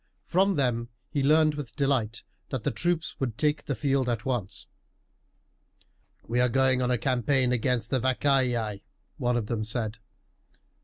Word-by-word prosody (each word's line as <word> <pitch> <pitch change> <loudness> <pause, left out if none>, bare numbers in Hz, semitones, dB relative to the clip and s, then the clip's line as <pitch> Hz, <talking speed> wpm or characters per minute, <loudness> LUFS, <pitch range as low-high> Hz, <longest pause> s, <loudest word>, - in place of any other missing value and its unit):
From 190 +2 +2
them 120 -4 0 0.2
he 145 - 0
learned 155 +2 +4
with 145 -5 -7
delight 130 -6 0 0.3
that 130 -5 -3
the - - 0
troops 170 +6 -1
would 120 -5 -2
take 150 -1 +1
the 140 - -2
field 135 -3 +1
at 120 +1 -2
once. 120 -8 -2 1.6
"We 120 +2 0
are 125 0 +4
going 130 0 +3
on 125 - +1
a 125 - +2
campaign 130 +1 +1
against 120 -2 0
the 130 - +2
Vacaei," 125 -5 +1 0.4
one 120 0 +1
of 115 - -1
them 110 0 -2
said. 110 -1 -3
125 Hz, 155 wpm, -27 LUFS, 120-140 Hz, 1.6 s, learned